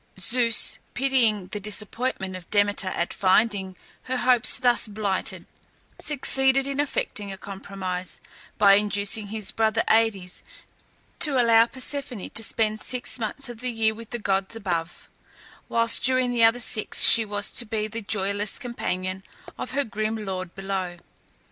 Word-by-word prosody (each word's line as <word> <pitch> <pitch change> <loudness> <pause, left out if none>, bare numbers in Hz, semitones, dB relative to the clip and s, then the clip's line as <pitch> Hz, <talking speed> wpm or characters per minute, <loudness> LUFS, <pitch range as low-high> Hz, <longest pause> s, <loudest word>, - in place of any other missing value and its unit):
Zeus, 230 +2 +1 0.2
pitying 235 -7 +1
the 210 - -5
disappointment 210 -1 -2
of 180 -2 -10
Demeter 205 -2 +1
at 170 -2 -2
finding 190 -1 +1 0.3
her 255 0 -2
hopes 250 -1 +4
thus 245 -2 +2
blighted, 205 -2 -3 0.5
succeeded 270 -2 +2
in 275 0 -4
effecting 210 -8 -2
a 190 - -7
compromise 190 -2 -6 0.4
by 200 -1 +6
inducing 205 +1 0
his 215 -1 -1
brother 225 0 +1
Aïdes 215 -5 +1 0.8
to 280 -4 +4
allow 230 -1 +5
Persephone 260 -4 -4
to - - -7
spend 215 0 0
six 250 0 -3
months 235 +5 -4
of 240 -2 -9
the 250 +1 -2
year 225 -2 +1
with 225 0 -11
the 240 - -4
gods 195 -1 -1
above, 175 -6 -4 0.6
whilst 230 0 +3
during 255 -1 +2
the 235 -1 +2
other 225 +2 +5
six 225 -2 +2
she 230 - +9
was 205 -1 -1
to - - +4
be 215 -1 -2
the 225 +2 -5
joyless 200 0 -1
companion 185 -7 -4 0.3
of - - -6
her 280 +2 0
grim 215 -1 -3
lord 185 -2 -5
below. 190 -2 -4
215 Hz, 150 wpm, -24 LUFS, 195-240 Hz, 0.8 s, she